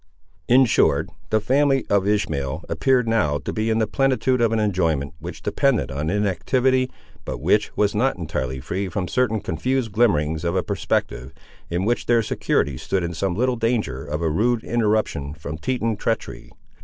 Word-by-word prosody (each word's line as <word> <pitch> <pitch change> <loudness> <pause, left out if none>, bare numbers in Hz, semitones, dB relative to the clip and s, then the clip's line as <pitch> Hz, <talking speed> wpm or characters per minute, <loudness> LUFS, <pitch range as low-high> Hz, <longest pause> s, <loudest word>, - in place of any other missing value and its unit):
In 130 +2 +6
short, 115 - +2 0.2
the 110 - +3
family 135 +4 +2
of 100 -1 +2
Ishmael 80 -10 -1
appeared 130 -3 +2
now 105 -11 +2
to 70 - -5
be 110 +1 -1
in 110 - +2
the 110 - +2
plenitude 130 +2 +1
of 115 -1 +3
an 115 - +1
enjoyment, 85 -9 0
which 80 0 -8
depended 135 - +1
on 75 +3 -2
inactivity, 120 +7 +1 0.3
but - - -4
which 105 0 +2
was 105 -1 +2
not 125 +6 +1
entirely 65 -6 -3
free 95 +9 -3
from 90 0 -3
certain 115 -3 0
confused 125 - -1
glimmerings 80 -8 +1
of 85 +1 -1
a 95 - +1
perspective, 65 +2 -2 0.3
in 90 +3 -1
which 120 +2 0
their 120 -1 +3
security 70 -9 0
stood 95 -2 -1
in 85 0 -3
some 90 +1 -1
little 125 +3 +1
danger 110 - -1
of 75 +3 -4
a 80 - +2
rude 115 +7 +1
interruption 105 -11 0
from 75 -1 -7
Teton 115 0 -1
treachery. 105 - -3
105 Hz, 175 wpm, -22 LUFS, 80-120 Hz, 0.3 s, In